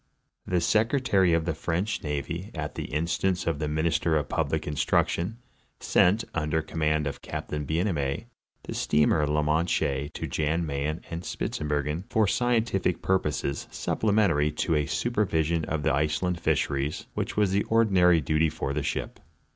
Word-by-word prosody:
The 90 Hz, -2 st, +1 dB
secretary 110 Hz, -, +3 dB
of 85 Hz, -1 st, +2 dB
the 85 Hz, -, 0 dB
French 90 Hz, +7 st, -2 dB
navy, 80 Hz, +6 st, -4 dB
at 75 Hz, -2 st, -4 dB
the -, -, -5 dB
instance 85 Hz, +4 st, -1 dB
of 80 Hz, -3 st, -1 dB
the 75 Hz, -, -1 dB
min 80 Hz, +2 st, -1 dB
ister 80 Hz, 0 st, +2 dB
of 75 Hz, -, -2 dB
public -, -, -1 dB
instruction, 85 Hz, +7 st, 0 dB, 0.4 s
sent, 105 Hz, +6 st, +3 dB
under 80 Hz, 0 st, 0 dB
command 75 Hz, -1 st, 0 dB
of 70 Hz, -1 st, -4 dB
Captain 75 Hz, -1 st, -5 dB
Bienaimé, 80 Hz, -5 st, -1 dB, 0.4 s
the -, -, -6 dB
steamer 75 Hz, 0 st, +2 dB
la 75 Hz, +1 st, +1 dB
Manche 75 Hz, -3 st, 0 dB
to -, -, -4 dB
Jan 80 Hz, +2 st, 0 dB
Mayen 75 Hz, +2 st, -2 dB
and 85 Hz, +1 st, -3 dB
Spitzber 75 Hz, -4 st, -2 dB
gen 80 Hz, +5 st, -3 dB
for 110 Hz, -1 st, +3 dB
scientific 115 Hz, -5 st, +1 dB
purposes, 75 Hz, -7 st, 0 dB
supplementary 100 Hz, -9 st, +1 dB
to 80 Hz, -, 0 dB
a 75 Hz, -2 st, +1 dB
supervision 85 Hz, -8 st, 0 dB
of 80 Hz, -2 st, -2 dB
the 80 Hz, -2 st, +2 dB
Iceland 75 Hz, +5 st, 0 dB
fisheries, 70 Hz, -2 st, 0 dB
which -, -, -3 dB
was 105 Hz, -3 st, +3 dB
the 100 Hz, +1 st, +2 dB
ordinary 95 Hz, -7 st, +4 dB
duty 80 Hz, +3 st, +2 dB
for 70 Hz, -2 st, -3 dB
the 75 Hz, -, -1 dB
ship. -, -, -3 dB
80 Hz, 155 wpm, -27 LUFS, 75-90 Hz, 0.4 s, ordinary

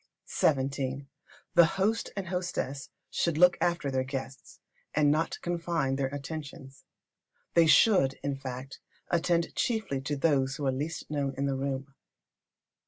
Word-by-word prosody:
xvii. 135 Hz, -1 st, 0 dB, 0.5 s
The 175 Hz, -2 st, +8 dB
host 215 Hz, +4 st, +1 dB
and 195 Hz, -2 st, -3 dB
hostess 175 Hz, -7 st, -3 dB, 0.2 s
should 170 Hz, -3 st, 0 dB
look 180 Hz, +1 st, +6 dB
after 170 Hz, -5 st, 0 dB
their 130 Hz, -1 st, +1 dB
guests, 135 Hz, 0 st, -7 dB, 0.4 s
and 150 Hz, -1 st, +4 dB
not 160 Hz, +2 st, 0 dB
confine 170 Hz, -5 st, -1 dB
their 135 Hz, -1 st, 0 dB
attentions. 140 Hz, -1 st, -8 dB, 0.7 s
They 165 Hz, -1 st, +5 dB
should, 160 Hz, -8 st, +5 dB
in 140 Hz, -1 st, -1 dB
fact, 135 Hz, 0 st, -7 dB, 0.3 s
attend 170 Hz, 0 st, +1 dB
chiefly 220 Hz, -, -1 dB
to 145 Hz, +2 st, -2 dB
those 135 Hz, -3 st, +2 dB
who 145 Hz, -, -4 dB
are 135 Hz, -, +3 dB
the 130 Hz, -, -3 dB
least 155 Hz, +2 st, -4 dB
known 140 Hz, -2 st, -1 dB
in 140 Hz, -, 0 dB
the 140 Hz, -, 0 dB
room. 135 Hz, 0 st, -3 dB
140 Hz, 145 wpm, -29 LUFS, 135-170 Hz, 0.7 s, The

